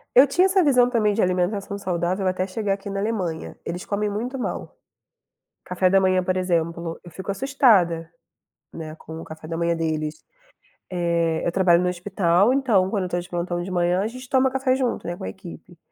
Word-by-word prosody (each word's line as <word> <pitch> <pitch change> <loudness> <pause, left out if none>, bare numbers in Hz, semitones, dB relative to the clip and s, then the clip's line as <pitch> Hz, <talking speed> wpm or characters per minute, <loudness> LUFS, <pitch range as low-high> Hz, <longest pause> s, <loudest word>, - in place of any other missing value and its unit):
Eu 260 +3 +9
tinha 355 +7 +3
essa 380 -1 +3
visão 250 -4 +4
também 215 -4 +2
de 220 - +1
alimentação 185 +2 0
saudável 185 0 -1
até 185 0 0
chegar 200 +1 -2
aqui 200 0 -7
na 195 - -3
Alemanha, 195 -6 -3
eles 175 +1 -5
comem 205 0 -1
muito 235 +6 -3
mal. 250 - -5 0.9
Café 180 0 +1
da 195 - +5
manhã, 185 -1 +3
por 185 0 -1
exemplo, 170 -2 -1
eu 175 - -11
fico 190 +3 -5
assustada, 195 - +3 0.6
né, 155 -1 -7
com 160 +1 -9
o - - -8
café 155 0 -10
da 165 - -3
manhã 170 0 +1
deles. 155 -1 -3 0.7
Eh, 170 -2 0
eu - - +1
trabalho 175 -1 +4
no 180 - +1
hospital, 180 +3 +2
então 225 -9 +2
quando 200 -2 -1
eu 180 - -4
tô 175 - -1
de 175 - -9
plantão 175 0 -2
de 175 - -5
manhã, 175 0 +1
a 205 - 0
gente 255 +2 -9
toma 265 0 +3
café 265 0 +1
junto, 260 -2 -1
né, 175 +1 -4
com 190 - -7
a - - -3
equipe. 175 -2 -11
185 Hz, 205 wpm, -23 LUFS, 170-215 Hz, 0.9 s, Eu